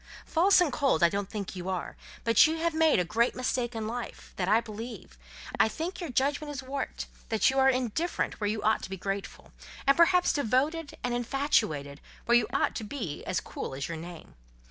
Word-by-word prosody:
False 360 +4 +4
and 335 -7 +2
cold 270 - +2
I 170 - +7
don't 200 +1 -3
think 200 -3 -5
you 180 0 -5
are; 185 -2 -3 0.3
but 230 +5 +6
you 320 +1 -1
have 335 0 0
made 320 -1 +4
a 180 - +3
great 230 +7 +1
mistake 245 -1 -1
in 220 -1 -3
life, 240 +2 -6
that 180 - -2
I 215 +3 +5
believe; 220 - -8 0.4
I - - +6
think 335 - -5
your 340 - -4
judgment 285 +4 0
is 275 -2 -5
warped—that 260 -3 -2
you 270 - +1
are 265 0 +6
indifferent 260 +4 -1
where 205 - +1
you 215 0 -2
ought 220 +1 +2
to - - -7
be 190 - -5
grateful—and 195 +7 -3
perhaps 360 +1 +4
devoted 285 +5 0
and 245 -1 -1
infatuated, 225 - 0 0.2
where 240 - +4
you 240 -3 +4
ought - - +1
to - - -4
be 210 - -5 0.2
cool - - -6
as 135 +1 -3
your 165 - -5
name. 170 +1 -10
240 Hz, 195 wpm, -29 LUFS, 200-285 Hz, 0.4 s, I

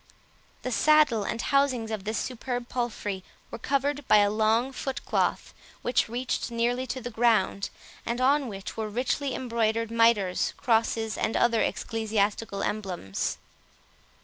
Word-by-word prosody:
The 255 - -3
saddle 300 -5 +4
and 230 - -3
housings 260 -4 +1
of 215 -3 -4
this 215 +1 -1
superb 245 -1 -4
palfrey 215 -6 -3 0.3
were - - -6
covered 280 +2 -1
by - - +7
a 205 0 +4
long 220 +4 +2
foot 270 0 -5
cloth, - - 0 0.3
which 245 -2 +1
reached 245 +1 -2
nearly 240 +2 0
to 260 - -3
the 245 +1 -6
ground, 225 -3 +2 0.3
and 235 +1 -2
on 275 +2 +3
which 195 -3 -7
were 220 -1 -3
richly 255 +4 -1
embroidered, 230 -2 0
mitres, 230 -5 +2
crosses, 225 -1 +1
and 220 - 0
other 235 -2 +3
ecclesiastical 215 -2 -1
emblems. 185 - -3
230 Hz, 140 wpm, -27 LUFS, 215-255 Hz, 0.3 s, by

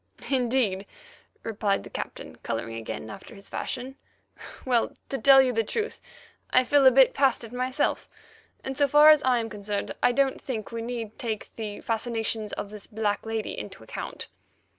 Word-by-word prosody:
"Indeed," 240 -7 +1 0.6
replied 210 -2 0
the - - -10
Captain, - - -6
colouring 115 0 -4
again 110 -1 -6
after - - -11
his 200 0 -14
fashion. 260 +2 -4 0.7
"Well, 245 -3 +1
to 270 - -2
tell 270 -1 +8
you 255 -1 0
the 225 0 +1
truth, 435 - -3 0.5
I 255 - +5
feel 275 +2 +5
a - - +9
bit 265 0 +6
past 270 -3 +2
it 230 +1 -9
myself, 255 +1 -1 0.5
and, 270 - -4
so 285 0 +3
far 295 +2 +8
as 305 -2 +5
I 255 -1 +3
am 230 -1 -1
concerned, 205 -2 -4
I - - +5
don't 270 +1 +1
think 230 -5 -5
we 230 0 -4
need 230 -2 -5
take 220 -3 -4
the 210 -2 -5
fascinations 225 -1 -2
of 200 - -5
this 210 -2 -9
black 210 0 -2
lady 225 -1 -3
into - - -8
account." - - -6
230 Hz, 175 wpm, -27 LUFS, 210-260 Hz, 0.7 s, a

